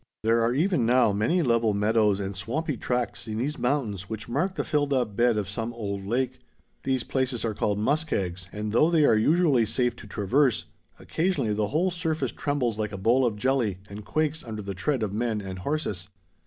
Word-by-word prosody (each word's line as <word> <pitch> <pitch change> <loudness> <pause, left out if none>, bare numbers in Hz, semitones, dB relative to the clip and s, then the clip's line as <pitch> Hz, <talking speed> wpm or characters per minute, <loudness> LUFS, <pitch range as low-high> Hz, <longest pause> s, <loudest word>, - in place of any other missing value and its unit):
There 115 +1 +3
are 115 - +2
even 170 -2 +2
now 120 -2 +4
many 160 - +1
level 115 -4 +2
meadows 105 -1 +2
and 100 0 -4
swampy 135 - -2
tracts 125 0 -2
in 110 0 -3
these 145 +6 -2
mountains 120 -7 -1
which 110 -1 -5
mark 160 +11 -1
the - - -1
filled 145 -2 0
up 120 -6 0
bed 120 -1 +3
of 105 -3 -1
some 115 +4 -3
old 100 -4 -4
lake. 130 +3 -1 0.4
These 130 -2 0
places 130 -4 -1
are 110 - -1
called 105 0 0
"muskegs," 105 - -1
and 105 0 -4
though 150 +9 +4
they 160 -3 +4
are - - +5
usually 145 +2 +3
safe 125 +2 0
to 105 - -11
traverse, 120 +6 +1 0.3
occasionally 165 - -1
the 105 0 0
whole 170 - +1
surface 160 -6 -1
trembles 125 -7 -1
like 105 -1 -1
a 100 - -5
bowl 120 +6 +3
of 105 -3 -3
jelly 120 -4 +1
and 105 +1 -7
quakes 155 +5 -1
under 110 -3 -6
the 100 0 -4
tread 115 +6 -1
of 100 -2 -2
men 110 0 -1
and 95 -2 -6
horses. 100 - -3
115 Hz, 200 wpm, -26 LUFS, 105-140 Hz, 0.4 s, are